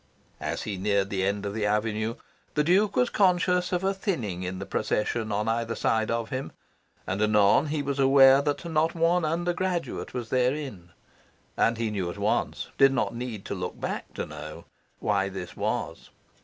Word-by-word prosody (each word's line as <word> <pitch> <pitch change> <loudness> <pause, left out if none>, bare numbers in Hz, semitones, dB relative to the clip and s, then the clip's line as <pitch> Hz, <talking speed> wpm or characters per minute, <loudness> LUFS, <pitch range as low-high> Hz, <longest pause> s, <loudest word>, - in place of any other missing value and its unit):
As - - -3
he 105 -3 -4
neared 100 0 0
the 95 -1 0
end 100 +1 -1
of 100 - -3
the 105 -1 0
avenue, 110 +2 0 0.4
the 150 - +3
Duke 190 +6 +3
was 250 -1 +2
conscious 180 -2 +2
of 180 0 0
a 195 +1 +2
thinning 130 - -3
in 90 0 -4
the - - -5
procession 110 +1 -1
on 105 +2 -1
either 115 0 -1
side 110 -1 +1
of 115 -1 -2
him, 130 +1 -4 0.5
and 95 +2 -2
anon 105 +6 +4
he 150 -1 -1
was 140 0 -2
aware 135 0 +7
that 145 +3 -2
not 160 0 +1
one 170 +1 +2
undergraduate 175 +2 -1
was 120 -3 -5
therein. 130 - -1 0.7
And 115 0 +2
he 115 -1 -1
knew 95 -4 -2
at - - -7
once - - -1
did 135 0 +7
not 120 -2 0
need 115 -4 -5
to - - -4
look 90 -2 -5
back - - -4
to - - -3
know 75 0 -9 0.3
why 100 -2 0
this 95 -2 -7
was. - - -3
115 Hz, 185 wpm, -27 LUFS, 100-155 Hz, 0.7 s, aware